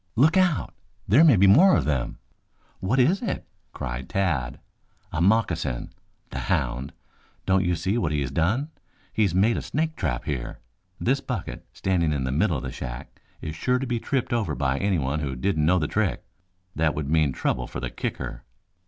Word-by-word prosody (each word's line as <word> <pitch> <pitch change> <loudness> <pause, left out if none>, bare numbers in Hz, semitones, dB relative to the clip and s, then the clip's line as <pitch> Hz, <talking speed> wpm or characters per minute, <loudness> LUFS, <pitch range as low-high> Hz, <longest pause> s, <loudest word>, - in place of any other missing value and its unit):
"Look 150 +8 +4
out! 180 -6 +2 0.3
There 125 - +6
may 150 -7 +7
be 100 0 +5
more 175 - +7
of - - 0
them!" 70 -5 -1 0.6
"What 100 +8 0
is 155 +10 +3
it?" 240 - -3 0.3
cried 65 0 -5
Tad. 70 -11 -1 0.5
"A 80 - -1
moccasin! 85 - +1 0.4
The - - -4
hound. 65 +2 0 0.5
Don't 95 0 +3
you 90 -1 +1
see 95 +8 0
what 80 -9 0
he 75 -1 0
has 65 -2 -3
done? 105 - 0 0.4
He's 100 -6 +1
made 110 +5 +3
a - - -2
snake 160 +2 -2
trap 65 - -2
here. 65 -5 -3 0.4
This 135 +3 +1
bucket 125 -9 -5
standing 85 -5 0
in 70 -3 -1
the 65 - -1
middle 80 +4 +2
of - - -6
the - - -4
shack 65 +1 -8 0.2
is 80 - -5
sure 125 +10 +1
to 135 - -3
be 120 -2 -1
tripped 130 +1 -1
over 115 -3 0
by 70 -1 0
anyone 75 -8 0
who 70 -3 -3
didn't 75 +3 0
know 90 +2 +4
the 75 -4 0
trick. 105 0 -1 0.5
That 80 -1 +1
would 75 -2 -3
mean 75 -2 +3
trouble 60 -1 -1
for - - -6
the - - -4
kicker." - - -4
90 Hz, 190 wpm, -25 LUFS, 70-115 Hz, 0.6 s, may